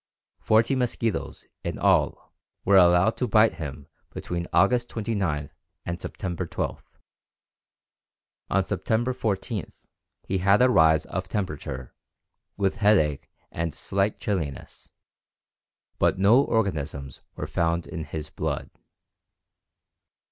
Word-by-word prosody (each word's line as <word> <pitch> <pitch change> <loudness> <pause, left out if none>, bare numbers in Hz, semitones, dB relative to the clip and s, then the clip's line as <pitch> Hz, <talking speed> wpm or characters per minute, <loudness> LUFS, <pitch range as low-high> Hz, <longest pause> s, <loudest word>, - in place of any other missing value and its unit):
Forty 110 +4 +3
mosquitoes, 120 -4 -2 0.2
in - - -3
all, - - +1 0.3
were 100 - +4
allowed 90 +4 +5
to 125 - 0
bite 110 0 +4
him 75 -1 -6 0.2
between 85 0 -4
August 120 +4 +3
29 95 -10 -2 0.3
and 85 +1 -4
September 90 -1 -4
12. - - -3 1.7
On 95 0 +2
September 110 +6 0
14 105 -4 -3 0.5
he 95 - -1
had 100 +2 +4
a 125 0 +5
rise 80 -5 +4
of 95 0 -5
temperature, 75 - -4 0.6
with 100 -1 0
headache 95 -9 +2 0.2
and 85 -2 -3
slight 100 +2 -1
chilliness, 80 -9 -4 1.1
but - - +3
no 105 +7 +5
organisms 75 - -2
were - - -4
found 85 0 0
in 80 - -6
his 75 -1 -6
blood. - - -3
95 Hz, 110 wpm, -26 LUFS, 80-110 Hz, 1.7 s, allowed